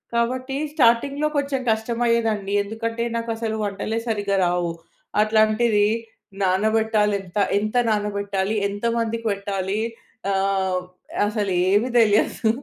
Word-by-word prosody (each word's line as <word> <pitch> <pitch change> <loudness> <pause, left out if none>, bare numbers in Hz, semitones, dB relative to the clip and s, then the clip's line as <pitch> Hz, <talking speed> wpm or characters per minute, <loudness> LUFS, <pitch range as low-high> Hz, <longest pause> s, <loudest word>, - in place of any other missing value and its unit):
కాబట్టి 255 +3 -1 0.2
స్టార్టింగ్‌లో 280 +2 +3
కొంచెం 280 -1 0
కష్టమయ్యేదండి. 225 -2 0
ఎందుకంటే 230 +2 -3
నాకు 230 0 -3
అసలు 225 -1 -2
వంటలే 215 +3 -2
సరిగ్గా 205 -3 0
రావు. 175 -1 0 0.5
అట్లాంటిది 215 0 +3 0.6
నానబెట్టాలి 210 +2 +2
ఎంత 185 +1 -9 0.2
ఎంత 215 +3 -3 0.2
నానబెట్టాలి, 205 -1 -1
ఎంతమందికి 230 +2 -2
పెట్టాలి. 200 0 -2 0.5
ఆహ్, 190 -1 +1 0.5
అసలు 210 -2 -1 0.2
ఏమీ 210 +5 +3
తెలియదు. 220 0 +3
215 Hz, 100 wpm, -23 LUFS, 200-230 Hz, 0.6 s, స్టార్టింగ్‌లో